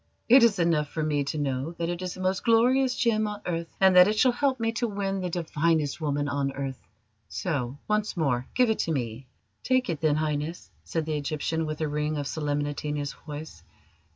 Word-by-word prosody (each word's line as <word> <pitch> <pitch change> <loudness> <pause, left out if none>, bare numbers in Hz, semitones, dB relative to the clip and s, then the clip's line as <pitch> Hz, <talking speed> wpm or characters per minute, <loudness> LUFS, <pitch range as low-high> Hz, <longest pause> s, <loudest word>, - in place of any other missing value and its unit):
"It 255 +3 +8
is 230 -4 +5
enough 165 -4 +2
for 160 - -3
me 150 -2 +1
to 145 - -3
know 140 +2 -2
that 170 0 -3
it 175 +1 -3
is 185 -1 -4
the 185 - -8
most 185 0 0
glorious 250 +3 +3
gem 215 -3 +2
on 210 0 -5
earth, 170 -1 -2
and 190 -1 +5
that 180 +1 +9
it 215 +1 0
shall 255 +3 +5
help 260 +1 0
me 225 0 0
to 235 +1 -1
win 195 -2 -2
the 180 - -2
divinest 160 -3 0
woman 145 -1 0
on 140 -1 -1
earth. 135 -1 -6 0.4
So, 140 -7 -3
once 210 -2 0
more, 130 -6 0
give 250 -3 +4
it 220 - -2
to 165 - 0
me!" 125 -2 -3 0.3
"Take 255 -6 +1
it, 155 - -5
then, 155 -2 +3
Highness," 155 +2 -3
said 165 -2 -2
the 155 -1 -1
Egyptian, 155 +2 -2
with 155 0 -4
a 155 - +1
ring 150 +1 -1
of 145 - -2
solemnity 145 0 -2
in 150 - -1
his 145 -1 -3
voice. 150 0 -9
160 Hz, 215 wpm, -27 LUFS, 145-200 Hz, 0.4 s, that